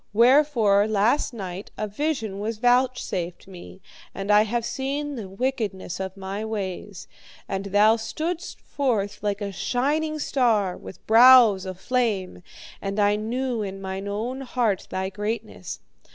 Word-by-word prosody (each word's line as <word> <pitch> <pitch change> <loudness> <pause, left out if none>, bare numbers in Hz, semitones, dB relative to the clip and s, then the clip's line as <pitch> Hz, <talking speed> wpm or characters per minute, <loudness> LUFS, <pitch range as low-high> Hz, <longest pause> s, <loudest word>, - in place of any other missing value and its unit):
Wherefore, 235 -4 +4
last 220 +8 +2
night 195 -4 -7
a 215 - -2
vision 220 -4 -2
was 215 +2 -3
vouchsafed 245 -7 0
me, 185 0 -12 0.3
and 195 +1 -2
I 210 0 +7
have 235 +1 -2
seen 285 +3 -3
the 220 -8 -6
wickedness 200 -5 -3
of 190 0 -5
my 195 +2 -5
ways. 200 -3 -5 0.4
And 195 0 -3
thou 210 +3 +4
stoodst 320 - -4
forth 215 -8 -2
like 205 0 -2
a 200 -1 -3
shining 295 - -1
star, 225 -10 +1
with 185 - -12
brows 225 -4 +7
aflame, 195 0 -2 0.4
and 195 +1 -3
I 205 0 +4
knew 235 +2 -2
in 195 -1 -5
mine 190 +1 -5
own 230 +6 -3
heart 240 -6 -1
thy 190 0 -2
greatness. 210 -2 -5
215 Hz, 140 wpm, -24 LUFS, 195-250 Hz, 0.4 s, I